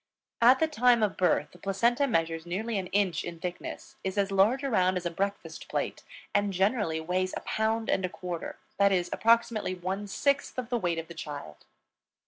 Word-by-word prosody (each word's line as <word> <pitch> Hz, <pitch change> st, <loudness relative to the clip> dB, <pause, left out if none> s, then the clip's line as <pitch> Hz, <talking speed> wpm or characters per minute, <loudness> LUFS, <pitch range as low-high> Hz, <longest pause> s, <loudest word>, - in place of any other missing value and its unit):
At 250 Hz, +3 st, +7 dB
the 320 Hz, -, +3 dB
time 250 Hz, -6 st, +4 dB
of 210 Hz, -, +1 dB
birth 175 Hz, -5 st, +2 dB
the 175 Hz, -, -17 dB
placenta 235 Hz, +9 st, +1 dB
measures 165 Hz, -5 st, -1 dB
nearly 210 Hz, +4 st, -2 dB
an 185 Hz, -, -4 dB
inch 190 Hz, -4 st, +1 dB
in 170 Hz, -1 st, -7 dB
thickness, 180 Hz, +1 st, -6 dB
is 190 Hz, +1 st, -3 dB
as 200 Hz, 0 st, +1 dB
large 210 Hz, +8 st, +3 dB
around 185 Hz, -8 st, +2 dB
as 180 Hz, -, -5 dB
a 175 Hz, -, -1 dB
breakfast 200 Hz, +4 st, -4 dB
plate, -, -, -2 dB, 0.3 s
and 205 Hz, 0 st, +2 dB
generally 190 Hz, -3 st, +1 dB
weighs 185 Hz, +3 st, -1 dB
a -, -, -6 dB
pound 220 Hz, +1 st, -1 dB
and 190 Hz, -, +1 dB
a 185 Hz, -, 0 dB
quarter, 175 Hz, -2 st, -6 dB, 0.2 s
that 200 Hz, 0 st, +4 dB
is, 180 Hz, -2 st, 0 dB
approximately 230 Hz, -4 st, +2 dB
one 190 Hz, +3 st, -4 dB
sixth 280 Hz, +8 st, 0 dB
of 250 Hz, -2 st, -3 dB
the 240 Hz, -1 st, 0 dB
weight 175 Hz, -4 st, 0 dB
of 165 Hz, 0 st, -4 dB
the 170 Hz, -, -9 dB
child. 145 Hz, -, -8 dB
195 Hz, 195 wpm, -29 LUFS, 175-225 Hz, 0.3 s, At